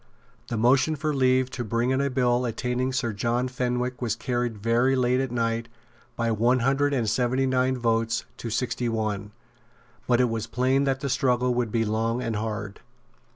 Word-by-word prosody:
The 115 Hz, -, -3 dB
motion 130 Hz, +7 st, +3 dB
for 155 Hz, +1 st, -2 dB
leave 130 Hz, -1 st, +2 dB
to 125 Hz, -, -4 dB
bring 115 Hz, +3 st, 0 dB
in 130 Hz, +1 st, +1 dB
a 140 Hz, -, +1 dB
bill 125 Hz, -1 st, +1 dB
attainting 125 Hz, +2 st, -1 dB
Sir 130 Hz, -4 st, -1 dB
John 120 Hz, +4 st, 0 dB
Fenwick 125 Hz, 0 st, -2 dB
was 115 Hz, -4 st, 0 dB
carried 120 Hz, -2 st, -2 dB
very 115 Hz, +5 st, +2 dB
late 125 Hz, 0 st, +2 dB
at 135 Hz, -1 st, -1 dB
night 115 Hz, -1 st, -1 dB, 0.5 s
by 115 Hz, -1 st, 0 dB
one 120 Hz, +3 st, +2 dB
hundred 135 Hz, +3 st, +2 dB
and 125 Hz, -5 st, 0 dB
seventy 130 Hz, +4 st, +1 dB
nine 130 Hz, 0 st, +1 dB
votes 115 Hz, -1 st, 0 dB
to 115 Hz, -, -5 dB
sixty 120 Hz, +1 st, -1 dB
one; 105 Hz, -2 st, -2 dB, 0.8 s
but 120 Hz, -1 st, +3 dB
it 125 Hz, -, +4 dB
was 115 Hz, -1 st, -3 dB
plain 130 Hz, +4 st, +1 dB
that 135 Hz, -1 st, 0 dB
the -, -, -2 dB
struggle 125 Hz, -1 st, +1 dB
would 120 Hz, -3 st, -1 dB
be 115 Hz, 0 st, +1 dB
long 115 Hz, +2 st, 0 dB
and 115 Hz, -3 st, -2 dB
hard. 105 Hz, -2 st, -4 dB
125 Hz, 185 wpm, -26 LUFS, 115-130 Hz, 0.8 s, it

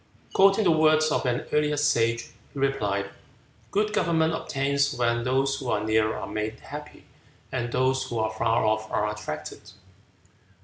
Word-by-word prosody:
Quoting 195 Hz, +2 st, +5 dB
the 175 Hz, -, +4 dB
words 155 Hz, 0 st, +4 dB
of 130 Hz, -, 0 dB
an 125 Hz, 0 st, -1 dB
earlier 150 Hz, 0 st, +2 dB
sage, 115 Hz, -5 st, +2 dB, 0.3 s
he -, -, -12 dB
replied, 100 Hz, -8 st, -1 dB, 0.6 s
"Good 210 Hz, +1 st, 0 dB
government 160 Hz, -3 st, +2 dB
obtains 140 Hz, -2 st, 0 dB
when 120 Hz, -1 st, +1 dB
those 135 Hz, +2 st, +1 dB
who 130 Hz, -, -5 dB
are 105 Hz, -, 0 dB
near 110 Hz, 0 st, +1 dB
are -, -, -5 dB
made 110 Hz, +1 st, -4 dB
happy, 150 Hz, +1 st, -10 dB, 0.5 s
and 120 Hz, -2 st, -2 dB
those 130 Hz, +1 st, +1 dB
who 120 Hz, -2 st, -5 dB
are 110 Hz, 0 st, 0 dB
far 115 Hz, +1 st, +1 dB
off 110 Hz, 0 st, 0 dB
are 105 Hz, -, +1 dB
attracted." 75 Hz, -8 st, -6 dB
130 Hz, 160 wpm, -26 LUFS, 110-150 Hz, 0.6 s, Quoting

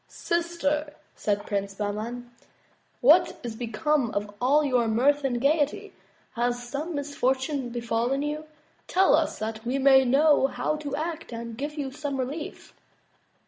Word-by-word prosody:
"Sister," 320 Hz, -3 st, -1 dB, 0.2 s
said 205 Hz, -1 st, -1 dB
Prince 200 Hz, -1 st, -2 dB
Bahman, 220 Hz, +4 st, -4 dB, 0.7 s
what 310 Hz, +8 st, +5 dB
is 235 Hz, -2 st, -5 dB
become 240 Hz, +4 st, 0 dB
of 205 Hz, 0 st, -2 dB
all 285 Hz, +5 st, +4 dB
your 250 Hz, -4 st, +2 dB
mirth 275 Hz, +6 st, +2 dB
and 250 Hz, -3 st, 0 dB
gaiety? 290 Hz, +2 st, +1 dB, 0.4 s
Has 245 Hz, +1 st, -1 dB
some 300 Hz, +6 st, -4 dB
misfortune 270 Hz, -1 st, -1 dB
befallen 240 Hz, +3 st, -1 dB
you? 300 Hz, +1 st, -3 dB, 0.4 s
Tell 380 Hz, +1 st, +4 dB
us, 315 Hz, 0 st, 0 dB
that 220 Hz, 0 st, -4 dB
we 250 Hz, +3 st, -1 dB
may 265 Hz, -1 st, +6 dB
know 280 Hz, +2 st, +4 dB
how 305 Hz, -, -2 dB
to 290 Hz, -2 st, -4 dB
act 315 Hz, -1 st, -4 dB
and 230 Hz, -1 st, -6 dB
give 290 Hz, +5 st, -4 dB
you 280 Hz, -3 st, -3 dB
some 290 Hz, 0 st, -4 dB
relief." 285 Hz, +5 st, -5 dB
270 Hz, 145 wpm, -26 LUFS, 235-300 Hz, 0.7 s, may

